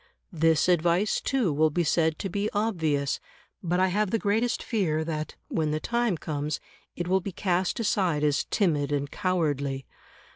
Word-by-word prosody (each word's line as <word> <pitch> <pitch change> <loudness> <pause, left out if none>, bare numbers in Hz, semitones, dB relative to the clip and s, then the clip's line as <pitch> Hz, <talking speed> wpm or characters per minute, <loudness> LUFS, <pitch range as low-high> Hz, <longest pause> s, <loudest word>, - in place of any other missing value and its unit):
This 160 -1 +3
advice, 175 +3 +2
too, 245 - +1
will 155 +2 +3
be 175 +3 0
said 160 0 +2
to 195 - -3
be 200 +3 -1
obvious; 160 -10 0 0.4
but 180 0 0
I 185 0 +3
have 205 +2 +1
the 225 - +1
greatest 220 +3 0
fear 165 -9 0
that, 155 -1 -4
when 155 -2 0
the 155 +1 0
time 235 0 0
comes, 150 -1 -3 0.4
it 175 - -3
will 190 +1 +2
be 195 - -5
cast 185 +1 0
aside 185 -8 +1
as 145 -1 +2
timid 150 -8 +1
and 140 -1 -1
cowardly. 145 -8 -1
175 Hz, 170 wpm, -27 LUFS, 155-200 Hz, 0.4 s, This